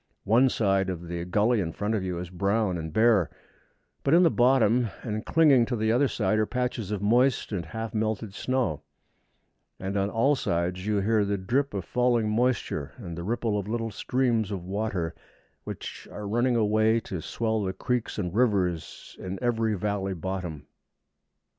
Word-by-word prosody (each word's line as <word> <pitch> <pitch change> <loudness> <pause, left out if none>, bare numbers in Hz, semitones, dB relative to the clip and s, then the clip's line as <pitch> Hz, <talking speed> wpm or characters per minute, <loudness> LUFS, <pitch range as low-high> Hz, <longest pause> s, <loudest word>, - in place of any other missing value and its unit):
One 120 +5 +4
side 95 -5 +1
of 85 -2 -5
the 85 0 -4
gully 105 +6 +2
in 80 -3 -2
front 105 +2 -2
of 105 -4 0
you 90 -2 -3
is 90 0 -6
brown 100 +1 0
and 80 -2 -5
bare, 110 -2 +4 0.7
but 140 - +4
in 175 - +6
the 165 - +5
bottom, 120 -2 +3
and 110 -2 -3
clinging 145 -8 +4
to 125 - -1
the 110 0 +1
other 130 +5 +3
side, 110 -3 0
are 110 - +1
patches 125 -5 -2
of 105 -2 -3
moist 120 +5 +2
and 90 -6 -3
half 115 +4 -5
melted 110 -1 -2
snow, 125 - -1 1.0
and 95 +1 -4
on 100 0 +1
all 120 +7 +3
sides 90 -3 -2
you 105 -2 +1
hear 110 +1 +2
the 100 0 -1
drip 125 +7 -1
of 95 - -3
falling 120 -3 +2
moisture 115 - 0
and 90 -8 -7
the 85 - -5
ripple 110 +1 -1
of 100 - -5
little 115 0 -2
streams 115 -1 0
of 95 -4 -4
water 95 -3 -2 0.5
which - - -7
are 105 0 -6
running 120 +4 +1
away 110 0 +3
to 95 -6 -5
swell 110 +5 -1
the 95 -2 -1
creeks 125 +4 -2
and 90 -4 -2
rivers 95 -9 0
in 95 +1 -5
every 115 -3 +1
valley 95 -1 -2
bottom. 90 -4 -5
105 Hz, 180 wpm, -27 LUFS, 95-120 Hz, 1.0 s, in